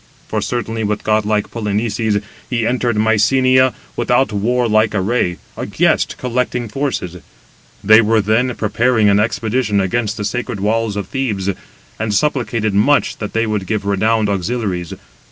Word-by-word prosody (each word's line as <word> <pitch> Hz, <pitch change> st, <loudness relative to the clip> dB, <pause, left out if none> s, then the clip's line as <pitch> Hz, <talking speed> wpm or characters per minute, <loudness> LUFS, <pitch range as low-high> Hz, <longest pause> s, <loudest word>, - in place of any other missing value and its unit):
For -, -, -2 dB
certainly 115 Hz, -2 st, -3 dB
with 105 Hz, 0 st, -2 dB
godlike 105 Hz, -1 st, 0 dB
Polynices 105 Hz, -1 st, -1 dB, 0.3 s
he 115 Hz, -3 st, 0 dB
entered 120 Hz, -1 st, 0 dB
Mycenæ 130 Hz, +5 st, +3 dB, 0.2 s
without 120 Hz, 0 st, +1 dB
warlike 110 Hz, 0 st, +1 dB
array, 95 Hz, -3 st, 0 dB, 0.2 s
a -, -, -5 dB
guest, -, -, +1 dB
collecting 125 Hz, -1 st, -2 dB
forces: 110 Hz, -8 st, -3 dB, 0.7 s
they 110 Hz, +2 st, +7 dB
187 105 Hz, -, -1 dB
were 110 Hz, 0 st, +3 dB
then 115 Hz, +4 st, +1 dB
preparing 110 Hz, 0 st, +2 dB
an 100 Hz, 0 st, +4 dB
expedition 110 Hz, 0 st, 0 dB
against 105 Hz, +3 st, -1 dB
the 105 Hz, -, -3 dB
sacred 120 Hz, 0 st, -3 dB
walls 110 Hz, +1 st, 0 dB
of 100 Hz, -, -4 dB
Thebes, 105 Hz, -8 st, -1 dB, 0.5 s
and 105 Hz, -1 st, -1 dB
supplicated 120 Hz, -6 st, 0 dB
much 125 Hz, +9 st, +2 dB
that 105 Hz, -, -6 dB
they 115 Hz, 0 st, +1 dB
would 105 Hz, -3 st, -2 dB
give 105 Hz, 0 st, -2 dB
renowned 110 Hz, +2 st, +1 dB
auxiliaries. 100 Hz, -3 st, -2 dB
110 Hz, 145 wpm, -17 LUFS, 105-120 Hz, 0.7 s, they